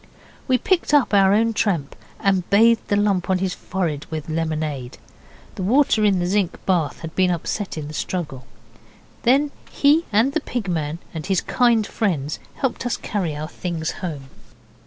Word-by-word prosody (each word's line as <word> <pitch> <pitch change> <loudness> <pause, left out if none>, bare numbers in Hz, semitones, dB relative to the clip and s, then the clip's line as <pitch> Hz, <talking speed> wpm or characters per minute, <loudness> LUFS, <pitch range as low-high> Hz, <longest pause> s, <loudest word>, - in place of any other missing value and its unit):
We 255 -2 +4
picked 345 - +1
up 280 -6 +3
our 195 -1 +5
own 225 +2 +3
tramp 170 -10 0 0.2
and 190 -3 +1
bathed 225 +3 +4
the 205 - +1
lump 200 -3 +1
on 190 - +3
his 185 0 -1
forehead 165 -6 -3
with 155 -1 -5
lemonade. 155 -5 -3 0.6
The - - -6
water 230 +2 +3
in 200 -2 +4
the 175 - 0
zinc 190 -1 0
bath 175 -6 0
had 160 -1 -7
been 185 -1 +3
upset 180 +3 -3
in 150 -2 -4
the 150 - -8
struggle. 145 -7 -4 0.7
Then 280 +4 +3 0.2
he 300 +4 +3
and 225 +7 +3
the 320 - 0
Pig 245 -7 -4
man 160 -3 -2 0.2
and 160 +1 -5
his 190 -2 +2
kind 235 -4 +2
friends 155 -11 -2 0.2
helped 265 -3 -2
us 245 - -1
carry 180 -8 -2
our 150 +1 -4
things 165 -2 -3
home. 145 -7 -5
185 Hz, 175 wpm, -22 LUFS, 160-220 Hz, 0.7 s, our